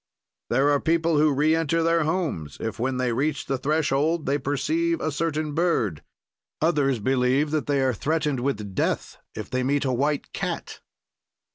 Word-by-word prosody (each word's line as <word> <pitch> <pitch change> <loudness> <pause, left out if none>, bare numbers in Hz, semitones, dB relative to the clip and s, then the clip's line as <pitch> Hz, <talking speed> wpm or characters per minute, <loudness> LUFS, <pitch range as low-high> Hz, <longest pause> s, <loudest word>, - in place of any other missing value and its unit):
"There 135 +4 +3
are 145 - +3
people 165 -1 +2
who 155 0 +4
reenter 160 +3 +2
their 165 -1 +2
homes 155 - -2
if, 115 0 -4
when 130 +2 -1
they 125 -2 0
reach 140 +4 -1
the 135 -1 -2
threshold, 155 +2 +1
they 140 +1 +1
perceive 330 - 0
a 155 - -1
certain 155 0 -2
bird; 145 - 0 0.6
others 145 -5 +2
believe 130 +5 +1
that 155 -1 -1
they 140 -2 +2
are 130 -1 +2
threatened 150 +2 -1
with 110 -7 -3
death - - -1 0.2
if 110 - -7
they 130 - 0
meet 140 +2 +1
a 130 - +1
white 140 +3 -1
cat." - - -4
145 Hz, 165 wpm, -25 LUFS, 130-160 Hz, 0.6 s, who